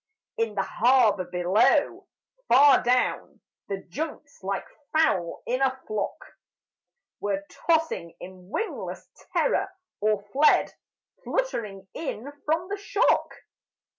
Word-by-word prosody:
In 225 -2 -1
the 195 - +1
harbour 230 -6 +3
below, 180 +4 +2 0.4
far 285 +1 +7
down, 250 +1 0 0.3
The 195 -1 -4
junks 290 - -6
like 195 0 -3 0.3
fowl 195 - +1
in 255 +2 -1
a 265 -1 +1
flock 215 -2 -3 1.0
Were 200 -1 -2 0.2
tossing 320 - +1
in 185 0 -11
wingless 445 - -4 0.2
terror, 390 - +1 0.3
or 210 -1 +1
fled 295 +3 +4 0.5
Fluttering 210 - -3
in 280 -4 -5 0.2
from 330 +3 +1
the 405 - -2
shock. 405 +3 +2
230 Hz, 105 wpm, -26 LUFS, 195-305 Hz, 1.0 s, far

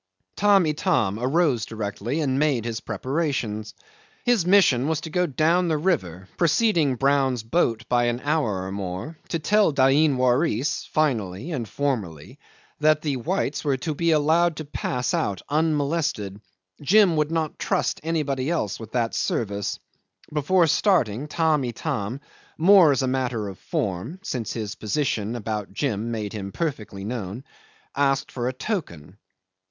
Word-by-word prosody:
'Tamb' 200 -3 +4
Itam 125 -9 0
arose 135 -2 +2
directly 110 +6 -3
and 135 -2 0
made 140 -7 +1
his 115 -1 -3
preparations. 130 -7 -3 0.5
His 235 -8 +2
mission 165 -10 +4
was 160 -1 0
to 160 - -7
go 180 0 +1
down 165 +5 +2
the 160 -2 +1
river, 95 - -1
preceding 165 - +2
Brown's 135 -2 +1
boat 115 -3 0
by 120 -1 +2
an 120 0 0
hour 140 -11 0
or 95 - -5
more, 95 - -5
to 165 - 0
tell 205 +4 +3
Dain 140 +1 +3
Waris 130 +2 +1
finally 120 - -1
and 120 -9 -3
formally 105 - -3 0.4
that 155 0 +3
the 145 -4 -1
whites 155 +2 -2
were 140 -3 +1
to 155 +5 -3
be 170 +3 0
allowed 160 +2 +3
to 155 - -6
pass 125 -3 -2
out 100 -3 -1
unmolested. 150 - 0 0.4
Jim 190 +3 +5
would 150 -1 +1
not 160 -2 -2
trust - - 0
anybody 150 -4 -1
else 165 - -1
with 110 -2 -10
that 120 -2 0
service. 100 -3 -2 0.6
Before 165 +4 +3
starting, 150 - +2
Tamb' 155 -2 +1
Itam, 120 -1 -3 0.4
more 175 -1 +7
as 135 -1 +1
a - - +1
matter 125 -5 -1
of 95 - -10
form 100 - -3
(since 125 - -3
his 110 -3 -4
position 110 -2 -2
about 105 -3 -4
Jim 115 -4 -1
made 110 -3 -4
him 100 -2 -5
perfectly 110 - -4
known), 110 0 -5 0.5
asked 135 -1 +1
for 120 -1 -3
a 130 - -1
token. 105 - -5
135 Hz, 150 wpm, -24 LUFS, 110-160 Hz, 0.6 s, more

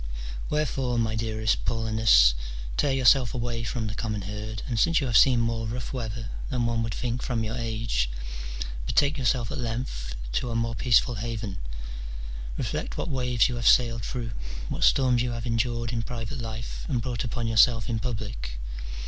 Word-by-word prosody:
Whefore, 135 -5 0
my 110 -1 +1
dearest 110 -1 0
Paulinus, 110 - +5 0.4
tear 145 - +2
yourself 130 -1 +4
away 120 -1 -2
from 115 0 -2
the 105 - -3
common 110 -3 -3
herd, 105 +2 -5
and 115 -3 -1
since 165 +5 +4
you 140 - -1
have 120 -3 -1
seen 125 +1 +7
more 115 -1 0
rough 120 +3 -4
weather 115 -2 -4 0.2
than 125 -2 0
one 115 -1 +1
would 115 -1 -2
think 125 +1 -2
from 120 -3 -1
your 110 +2 -3
age, 110 - -1 0.8
betake 145 - +3
yourself 120 -3 +1
at - - -4
length 115 - -3 0.2
to 120 - -1
a 115 - -3
more 115 0 0
peaceful 120 +1 +3
haven: 110 -5 -4 1.0
reflect - - -3
what - - -2
waves 125 -3 +2
you 125 -2 -3
have 120 - 0
sailed 115 -3 +5
through, 115 -1 -3 0.4
what - - -2
storms 125 -3 +4
you 120 -1 -1
have 115 -1 -5
endured 115 0 0
in 115 - 0
private 120 +4 -5
life, 115 0 -5
and 125 -6 0
brought 120 -1 -2
upon 120 -1 -2
yourself 115 0 +4
in 115 -2 -1
public. 105 - -4
115 Hz, 175 wpm, -27 LUFS, 110-125 Hz, 1.0 s, seen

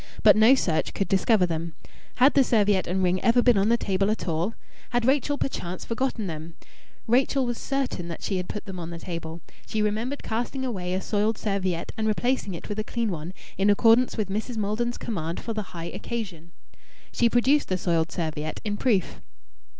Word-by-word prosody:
But - - +8
no 220 +5 +7
search 165 -11 0
could 195 - 0
discover 195 0 +3
them. 165 -1 -4 0.4
Had 260 +3 +5
the 275 - +5
serviette 205 -5 +2
and 185 +2 0
ring 185 +1 +2
ever 240 +1 +4
been 245 -2 +5
on 200 +2 +3
the 235 - +4
table 195 -2 0
at 215 -2 -2
all? 170 +7 -1 0.3
Had 240 -1 0
Rachael 285 +2 +2
perchance 180 -10 -4
forgotten 235 -2 -2
them? 160 -1 -6 0.5
Rachael 260 +3 +2
was 240 -1 -3
certain 270 -11 -2
that 170 - -7
she 195 - -1
had 180 0 -4
put 210 - -5
them 190 -2 -6
on 165 -1 -5
the 170 - -6
table. 165 -1 -6 0.3
She 220 - -2
remembered 225 +7 -2
casting 245 +4 -2
away 185 -7 -2
a 190 - -1
soiled 210 +2 0
serviette 190 -5 -2
and 220 - 0
replacing 220 -3 0
it - - -8
with 210 +1 -4
a - - 0
clean 230 -1 -2
one 165 0 -5 0.3
in 200 +1 +4
accordance 230 +5 +4
with 210 -3 -1
Mrs. 220 +4 -3
Maldon's 220 +4 -1
command 170 -6 -3
for 230 - -4
the 215 - -2
high 165 -1 -6
occasion. 185 -8 -6 0.6
She 235 - +3
produced 260 +5 +3
the 185 - 0
soiled 170 -2 0
serviette 155 -2 -3
in 205 -1 -1
proof. 205 -8 0
205 Hz, 195 wpm, -26 LUFS, 175-235 Hz, 0.6 s, But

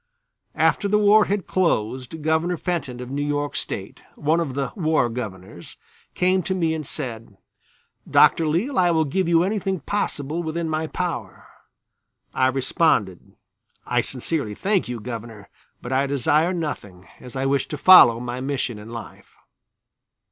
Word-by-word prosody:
After 205 - +2
the 210 +1 +3
war 210 0 +5
had 200 -2 -2
closed 130 -3 -1
Governor 160 +3 +1
Fenton, 145 -10 -3
of 125 +1 -8
New 140 +1 -2
York 145 0 -2
State, - - -5 0.2
one 155 +3 +1
of 145 -6 -3
the 140 -1 -2
"War 155 - +1
Governors," 95 -6 -8 0.4
came 185 +1 +2
to 190 +2 -2
me 165 -3 0
and 155 -3 -5
said: 115 -8 -6 0.7
"Dr. 165 - +5
Leale, 195 - 0
I 175 -1 +4
will 160 -2 +2
give 185 +5 -1
you 170 0 +4
anything 195 -1 -1
possible 155 -3 -3
within 165 0 -3
my 160 0 -2
power." 160 - -5 0.9
I 130 - +3
responded: 130 - 0 0.5
"I - - +1
sincerely 130 -4 -3
thank 195 - 0
you, 120 -1 -4
Governor; 115 -3 -8 0.3
but 120 - -6
I 135 +1 +1
desire 150 +5 +2
nothing, 105 - -5
as 125 - -11
I 135 0 -1
wish 135 0 +1
to 150 - -5
follow 135 -9 +8
my 125 +1 -5
mission 130 -5 -3
in 105 +2 -11
life." 115 0 -10
145 Hz, 155 wpm, -23 LUFS, 125-170 Hz, 0.9 s, follow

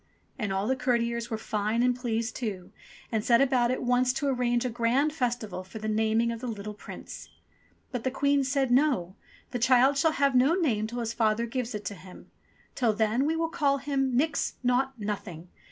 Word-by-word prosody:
And 210 -4 -2
all 195 +1 -1
the 260 +4 +1
courtiers 235 -2 0
were 220 - -2
fine 215 +2 -1
and 250 0 +3
pleased 230 -2 -2
too, 200 -7 -5 0.4
and 220 -2 0
set 235 0 +4
about 255 -3 +3
at 255 - -1
once 250 +1 +3
to 285 - -2
arrange 245 -2 +1
a - - 0
grand 245 +6 +1
festival 235 - -2
for 190 +4 -10
the 215 0 -5
naming 220 +2 +1
of 230 - -5
the 250 - -5
little 210 -2 -5
Prince. 210 - -10 0.6
But 250 -3 -4
the 260 - +1
Queen 280 +1 +2
said, 265 -1 0
"No! 245 - +2 0.4
The 245 - -2
child 255 +3 +4
shall 320 +2 +3
have 280 -1 +2
no 260 +6 +4
name 235 - 0
till 240 +2 -4
his 230 0 -3
father 225 0 +1
gives 235 -1 -3
it 210 - -6
to - - -3
him. 185 -1 -14 0.4
Till 235 -4 +1
then 220 +5 +1
we 320 - +1
will 330 0 -1
call 285 -4 +1
him 270 -2 -1
*Nix! 290 +1 0
Naught! 255 +1 +1
Nothing 190 -5 -5
240 Hz, 200 wpm, -28 LUFS, 220-265 Hz, 0.6 s, set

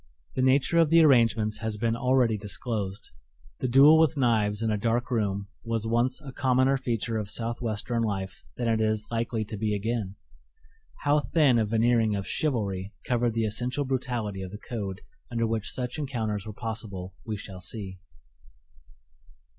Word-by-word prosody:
The - - -1
nature 135 +5 +3
of 165 -3 +4
the 165 +1 +6
arrangements 115 -6 +4
has 110 -2 -3
been 115 +1 0
already 125 -2 +2
disclosed. 105 -1 -4 0.5
The 130 - -1
duel 140 +5 +7
with 160 -1 +3
knives 110 -4 +2
in 110 - +1
a - - +1
dark 120 +3 0
room 100 -4 -1 0.2
was 115 -1 -2
once 120 +3 +1
a 140 -3 -8
commoner 130 0 +2
feature 115 -3 -2
of 105 -2 -5
Southwestern 115 0 -2
life 95 - -3
than 120 - -1
it 110 -1 +2
is 110 -1 0
likely 115 -1 -1
to 105 +1 -6
be 105 0 0
again. 105 -2 -2 0.9
How 145 +1 +4
thin 145 -5 +3
a 110 - +2
veneering 115 -1 +2
of 100 -1 -3
"chivalry" 105 -9 -1
covered 120 -2 +1
the 115 -1 +1
essential 125 +6 -1
brutality 120 -6 -2
of 95 - -5
the 105 - -8
code 105 -4 -5 0.3
under 115 -2 0
which 110 -2 -2
such 125 +3 -4
encounters 110 -8 -3
were 105 - -6
possible 105 -5 -6
we 110 -2 -4
shall 95 -2 -9
see. 95 0 -7
115 Hz, 165 wpm, -27 LUFS, 105-125 Hz, 0.9 s, duel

